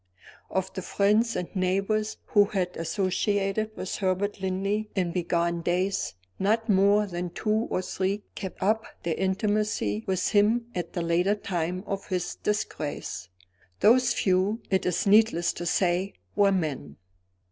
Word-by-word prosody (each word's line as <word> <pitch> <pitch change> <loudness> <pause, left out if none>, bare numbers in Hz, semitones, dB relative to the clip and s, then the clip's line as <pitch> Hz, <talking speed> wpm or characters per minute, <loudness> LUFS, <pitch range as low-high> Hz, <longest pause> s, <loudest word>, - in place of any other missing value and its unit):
Of 190 0 -2
the 190 - -4
friends 210 +5 +2
and 180 +3 -4
neighbors 195 +4 0
who 205 -1 +4
had 185 -3 -2
associated 200 +4 -1
with 185 - -4
Herbert 195 +1 -1
Linley, 195 +3 -1
in 180 -3 0
bygone 170 -1 0
days, 180 - 0 0.2
not 220 +4 +1
more 200 +1 +4
than 175 -2 -4
two 215 +5 0
or 185 - -1
three 195 +3 -2
kept 190 -2 -6
up 220 +3 +2 0.2
their 170 - 0
intimacy 190 - 0
with 185 -1 +1
him 220 +3 +3
at 175 -2 -4
the 175 - -2
later 175 +4 +2
time 180 -2 -3
of 195 0 -4
his 180 -2 -2
disgrace. 205 - -3 0.5
Those 240 +2 +5
few, 190 +4 +1
it 190 -1 +2
is 180 - 0
needless 205 -4 +4
to 175 - -5
say, 180 +2 +1 0.2
were 200 -1 +4
men. 145 - -2
190 Hz, 145 wpm, -27 LUFS, 180-210 Hz, 0.5 s, Those